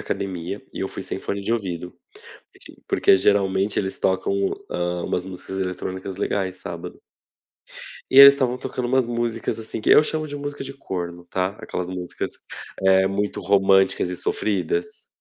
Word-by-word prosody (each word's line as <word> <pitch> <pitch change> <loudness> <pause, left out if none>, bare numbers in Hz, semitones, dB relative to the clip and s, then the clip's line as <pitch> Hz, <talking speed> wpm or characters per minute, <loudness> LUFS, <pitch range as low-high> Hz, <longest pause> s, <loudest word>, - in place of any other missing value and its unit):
academia 95 0 -4
e - - -6
eu 95 - -2
fui - - -7
sem - - -4
fone 100 0 -3
de 110 - -1
ouvido, 90 -6 -3 0.6
aquilo - - -15
porque - - +4
geralmente 100 0 +2
eles 95 -1 -3
tocam, 95 +1 +1 0.4
hã, 90 0 -2
umas 90 - -1
músicas 95 0 -6
eletrônicas 95 +1 -4
legais 95 -2 -1
sábado. 85 -2 -8 1.1
E 135 - +9
eles 140 0 +11
estavam 125 -3 0
tocando 125 0 -5
umas 130 0 +2
músicas, 120 -1 -2
assim, 110 0 -5
que - - +1
eu - - +8
chamo 155 0 -2
de 145 - -5
música 145 0 -5
de 135 0 -6
corno, 85 -9 -6
tá, 90 +1 -1
aquelas 90 -4 -4
músicas, 90 -1 -4 0.5
eh, 95 0 +5
muito 100 +1 -2
românticas 95 -2 +3
e 90 - -4
sofridas. 425 - -2
95 Hz, 160 wpm, -23 LUFS, 95-120 Hz, 1.1 s, eles